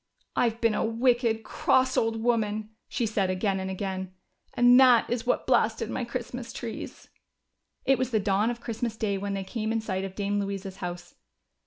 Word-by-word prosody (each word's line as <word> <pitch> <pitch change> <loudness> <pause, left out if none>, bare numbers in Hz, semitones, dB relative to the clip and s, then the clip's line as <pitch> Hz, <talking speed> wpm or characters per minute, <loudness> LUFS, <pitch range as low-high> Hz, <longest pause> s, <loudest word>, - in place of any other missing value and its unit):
" - - -48
I've 230 -1 +1
been 230 -2 +2
a - - 0
wicked, 230 -1 +1
cross 260 +3 +2
old 225 0 0
woman," 215 -2 0 0.2
said 235 - -1 0.2
she - - 0
again 190 +1 0
and 190 0 -3
again, 190 -1 -4 0.2
" - - -41
and 245 +1 +7
that 250 -3 +6
is 240 0 -2
what - - +1
blasted 225 -3 +2
my - - -2
Christmas 240 0 -5
trees." 230 -2 -7 0.8
It 270 -2 +3
was 255 -1 0
the 225 -4 +1
dawn 205 +2 +1
of 240 -1 -4
Christmas 230 -1 -3
day 200 -3 -1
when 200 0 -3
they 195 - -3
came 215 +3 -3
in 225 - +1
sight 190 -4 -3
of 190 -1 -6
Dame 205 0 -1
Louisa's 195 -1 -4
house. 175 -1 -6
220 Hz, 195 wpm, -27 LUFS, 195-235 Hz, 0.8 s, and